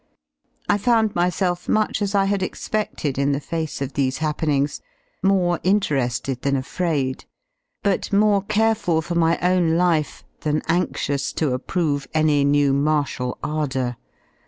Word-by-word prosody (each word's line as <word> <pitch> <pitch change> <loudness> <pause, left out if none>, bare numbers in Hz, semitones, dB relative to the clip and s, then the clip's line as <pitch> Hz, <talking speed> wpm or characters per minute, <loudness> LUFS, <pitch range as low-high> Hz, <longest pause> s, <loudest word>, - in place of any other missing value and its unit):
I 205 - +2
found 225 -1 +2
myself 175 0 0
much 215 0 +1
as 200 0 -1
I 195 -1 +4
had 200 0 0
expedled 185 -8 -3
in 140 +1 +2
the 140 - -1
face 160 -2 -4
of 135 - -6
these 135 -2 0
happenkigs: 150 -2 -1 0.4
morejriterei 175 -9 +1
led.than 140 +1 -1
afraid^ 140 -1 -2 0.6
but 200 -2 0
more 205 0 +4
careful 215 -5 +1
for 175 - -4
my 170 0 +2
own 175 -2 +3
lire 170 -3 +3 0.4
than 155 0 -1
anxious 160 -5 0
to 150 -5 0
approve 145 +1 -1
any 155 -2 +3
new 140 -1 +3
martial 140 -3 0
ardour. 130 -5 -2
160 Hz, 135 wpm, -22 LUFS, 140-185 Hz, 0.6 s, I